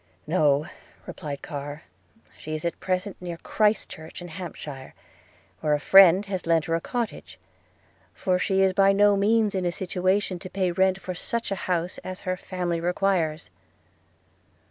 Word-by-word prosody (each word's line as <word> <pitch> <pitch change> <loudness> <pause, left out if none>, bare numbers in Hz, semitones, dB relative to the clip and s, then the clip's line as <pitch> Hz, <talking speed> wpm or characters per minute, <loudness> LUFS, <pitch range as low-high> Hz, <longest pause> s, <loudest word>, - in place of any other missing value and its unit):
'No,' 150 -3 +2 0.4
replied 145 -5 -7
Carr; 145 +1 -6 0.5
'she 155 0 -6
is 155 - -4
at 170 - -2
present 185 +1 -2
near 175 -2 -5
Christchurch 210 -6 -1
in 175 0 -8
Hampshire, 155 -6 -8 0.6
where 150 -1 +2
a - - -2
friend 190 +3 +7
has 190 -4 -4
lent 165 -2 +3
her 165 - -2
a 165 - +1
cottage, 240 +2 -4 0.7
for 185 -1 0
she 190 +1 +2
is 190 -1 +3
by 195 +1 +5
no 205 0 +5
means 210 +1 +2
in 190 -1 -1
a 175 - 0
situation 185 +1 -1
to 185 - -8
pay 185 -2 0
rent 190 +2 +2
for 185 -1 -5
such 235 +5 -2
a - - +1
house 175 0 -1
as 185 0 -7
her 185 0 -2
family 180 -2 -3
requires.' 175 -3 0
180 Hz, 160 wpm, -25 LUFS, 165-195 Hz, 0.7 s, friend